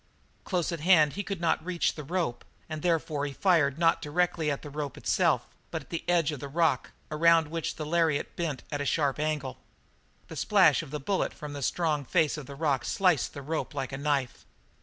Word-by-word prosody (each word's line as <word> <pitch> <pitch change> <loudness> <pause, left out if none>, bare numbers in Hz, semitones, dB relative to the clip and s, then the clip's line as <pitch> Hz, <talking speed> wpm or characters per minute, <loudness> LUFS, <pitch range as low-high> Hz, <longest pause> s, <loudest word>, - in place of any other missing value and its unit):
Close 180 -3 -1
at 170 - -3
hand 155 -3 +5
he 205 - -3
could 195 -3 -4
not 170 -2 +1
reach 175 0 0
the 150 - -7
rope, 160 -6 -2 0.2
and 155 -1 -5
therefore 160 -4 0
he 140 - -6
fired 155 -4 +2
not 165 0 +3
directly 165 0 0
at 140 - -3
the 150 - -7
rope 145 -2 -4
itself, - - +2 0.2
but - - -4
at - - -25
the 165 - -3
edge 170 -3 +3
of 150 - -6
the 140 - -6
rock 160 -2 +1 0.2
around 165 0 +4
which 165 -1 -3
the 155 - -5
lariat 160 -2 +1
bent 155 -7 -3
at 145 -1 -2
a - - 0
sharp 145 -2 +1
angle. 150 -4 -2 0.7
The - - -9
splash - - +4
of - - -10
that 150 0 -5
bullet 195 +1 0
from 150 -3 -7
the 145 - -6
strong 155 +1 0
face 160 +3 +2
of 150 -4 -8
the 140 - -8
rock 140 -4 0
sliced 180 -5 +1
the 140 - -7
rope 155 +1 -3
like 135 -1 -3
a 135 - -4
knife. 140 -3 -1
155 Hz, 215 wpm, -28 LUFS, 145-170 Hz, 0.7 s, hand